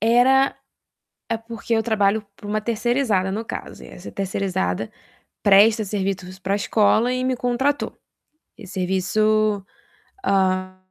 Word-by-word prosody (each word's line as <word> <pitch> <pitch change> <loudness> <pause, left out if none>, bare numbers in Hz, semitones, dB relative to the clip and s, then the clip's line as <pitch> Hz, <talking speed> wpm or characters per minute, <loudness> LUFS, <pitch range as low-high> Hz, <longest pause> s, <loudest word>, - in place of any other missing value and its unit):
era 250 +5 +4 0.8
é 230 - 0
porque 230 +1 -5
eu 225 -1 +2
trabalho 215 -1 +1
para 205 - -11
uma 215 +1 0
terceirizada, 230 -3 0
no 220 +4 -3
caso, - - -7
e - - -12
essa - - -10
terceirizada 180 - -2 0.5
presta 210 +3 +6
serviços 190 -2 -3
pra 195 +1 -1
escola 215 +3 +2
e 255 0 -1
me 255 0 +1
contratou. 255 +4 -1 0.6
Esse 200 -3 -11
serviço, 205 +3 +1 0.6
hã, 185 -1 +1
210 Hz, 125 wpm, -22 LUFS, 190-230 Hz, 0.8 s, presta